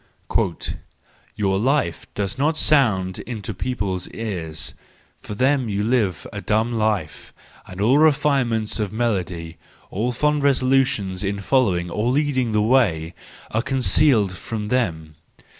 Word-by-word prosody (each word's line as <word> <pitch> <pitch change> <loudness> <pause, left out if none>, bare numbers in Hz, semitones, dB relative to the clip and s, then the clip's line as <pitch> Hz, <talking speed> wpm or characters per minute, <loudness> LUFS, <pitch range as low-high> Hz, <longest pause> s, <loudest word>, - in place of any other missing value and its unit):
—" - - -9
Your 95 -2 0
life 135 +6 0
does 100 -1 -2
not 155 +4 +1
sound 105 -14 +2
into 110 -3 -5
people's 100 -4 -3
ears: 90 -9 -5 0.5
for 105 - -8
them 130 +1 +2
you 100 0 -1
live 105 - 0
a 100 - -5
dumb 110 +3 0
life, 105 -9 -1 0.4
and 90 0 -10
all 120 +8 +4
refinements 135 -8 +2
of 105 -2 -1
melody, 90 -8 -2 0.3
all 115 +6 -1
fond 150 +4 +1
resolutions 130 -8 +1
in 100 0 -1
following 95 -7 +1
or 105 +6 0
leading 130 -3 +1
the 105 -1 +2
way, 95 -10 +2 0.4
are 110 - +1
concealed 125 -3 +3
from 105 +3 -5
them. 80 -11 -1
110 Hz, 130 wpm, -22 LUFS, 95-130 Hz, 0.5 s, all